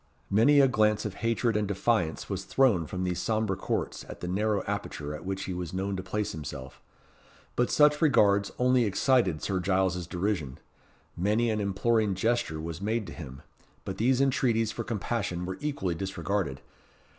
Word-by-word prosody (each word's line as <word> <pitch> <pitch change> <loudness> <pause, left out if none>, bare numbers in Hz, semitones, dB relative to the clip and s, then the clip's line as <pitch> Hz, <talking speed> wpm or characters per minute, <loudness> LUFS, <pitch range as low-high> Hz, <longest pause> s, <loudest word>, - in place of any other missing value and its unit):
Many 120 +9 +5
a 135 - +7
glance 105 -3 +2
of 105 - -3
hatred 115 0 +1
and 105 -1 +1
defiance 100 -4 0
was 95 -1 -3
thrown 110 - +3
from 90 +2 -4
these 90 -1 -1
sombre 110 -3 0
courts - - -3
at - - -8
the 90 - -5
narrow 100 +2 0
aperture 75 0 -4
at 75 - -8
which 95 0 -2
he 95 - -4
was 90 -1 -5
known 95 +1 -1
to 95 - -3
place 105 +3 -2
himself; 70 -4 -8 0.7
but 125 - +1
such 150 +1 +4
regards 100 -10 +4
only 125 -1 +3
excited 100 - +2
Sir 95 -2 0
Giles's 90 -2 0
derision: 85 -7 -2 0.6
many 105 +6 +1
an 110 - -1
imploring 105 +1 +1
gesture 110 -6 0
was 80 +2 -6
made 110 +2 -1
to 80 - -8
him; 70 -5 -9 0.4
but 95 - -5
these 125 +3 +3
entreaties 120 -5 +2
for 115 - -4
compassion 105 -5 -2
were 95 +1 -5
equally 140 - -1
disregarded. 95 -4 -2
100 Hz, 170 wpm, -28 LUFS, 90-115 Hz, 0.7 s, a